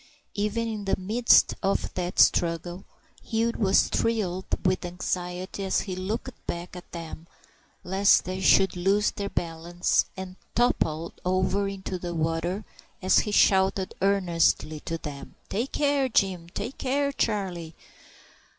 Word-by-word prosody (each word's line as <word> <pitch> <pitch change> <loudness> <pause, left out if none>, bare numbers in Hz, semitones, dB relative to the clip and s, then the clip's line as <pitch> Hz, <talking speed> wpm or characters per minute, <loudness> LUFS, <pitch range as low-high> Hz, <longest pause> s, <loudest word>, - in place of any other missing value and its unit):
Even 210 +3 -1
in 215 -2 -4
the 195 - +1
midst 220 +6 +4
of 195 - 0
that 180 0 -3
struggle 175 +2 +2 0.4
Hugh 230 +1 0
was 195 -3 +3
thrilled 195 -5 -1 0.2
with 185 0 +2
anxiety 180 +2 -4
as 190 - +1
he 185 -3 -5
looked 195 +5 -4
back 175 +1 -5
at 180 - -11
them 165 -1 -8 0.6
lest 195 +2 +4
they 185 +1 -4
should 190 0 +4
lose 195 +4 +2
their 200 -1 -4
balance 170 +1 0
and 190 0 -7 0.2
topple 170 -9 +1
over 185 +2 +1
into 190 -2 -5
the 175 -1 -5
water, 165 +5 -1 0.3
and 185 0 -3
he 210 - +4
shouted 190 -1 +3
earnestly 170 -5 +2
to 165 +2 -4
them,— 145 -3 -8
"Take 235 +7 -2
care, 285 -2 +2
Jim! 185 -6 +1
Take 230 +8 -6
care, 280 +2 0
Charlie!" 185 - -2
190 Hz, 135 wpm, -26 LUFS, 175-205 Hz, 0.6 s, midst